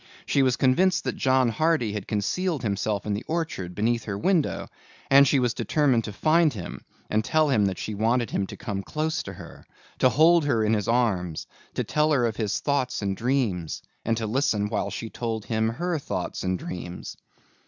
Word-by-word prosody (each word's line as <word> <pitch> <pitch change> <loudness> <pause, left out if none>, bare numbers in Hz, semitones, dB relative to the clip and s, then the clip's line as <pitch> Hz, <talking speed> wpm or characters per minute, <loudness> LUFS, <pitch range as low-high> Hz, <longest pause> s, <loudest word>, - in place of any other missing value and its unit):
She 140 - +2
was 130 -2 +3
convinced 180 +9 +3
that - - -2
John 130 -2 +3
Hardy 155 -4 +1
had 105 -2 -5
concealed 145 - -1
himself 100 -1 -1
in 105 - -1
the 105 +4 -3
orchard 155 - -3
beneath 115 +2 0
her 100 -2 -3
window 170 - +1 0.4
and 140 +1 +8
she 140 - +3
was 125 -2 +1
determined 125 0 +1
to 105 - -5
find 155 +8 +3
him 95 -6 -7 0.2
and 110 +1 +1
tell 155 +4 +2
him 110 -7 +3
that 95 -2 -1
she 110 - -4
wanted 115 +2 +1
him 95 - -1
to - - -9
come 100 -4 -4
close 155 +9 -2
to - - -8
her, - - -12 0.4
to 130 - +5
hold 160 +3 +5
her 115 -6 +2
in 110 - +2
his 105 -2 0
arms, 100 -9 0 0.3
to - - 0
tell 150 +1 +1
her 125 -4 +3
of 110 -3 -2
his 105 -2 -1
thoughts 140 -6 -1
and 100 -1 -1
dreams 115 - -1 0.2
and 115 0 0
to 115 - -2
listen 105 -3 0
while 105 -2 -1
she 110 +3 -6
told 115 -3 -3
him 110 -1 0
her 170 +7 -2
thoughts - - -4
and 95 0 -1
dreams. 90 0 -7
115 Hz, 200 wpm, -25 LUFS, 105-140 Hz, 0.4 s, and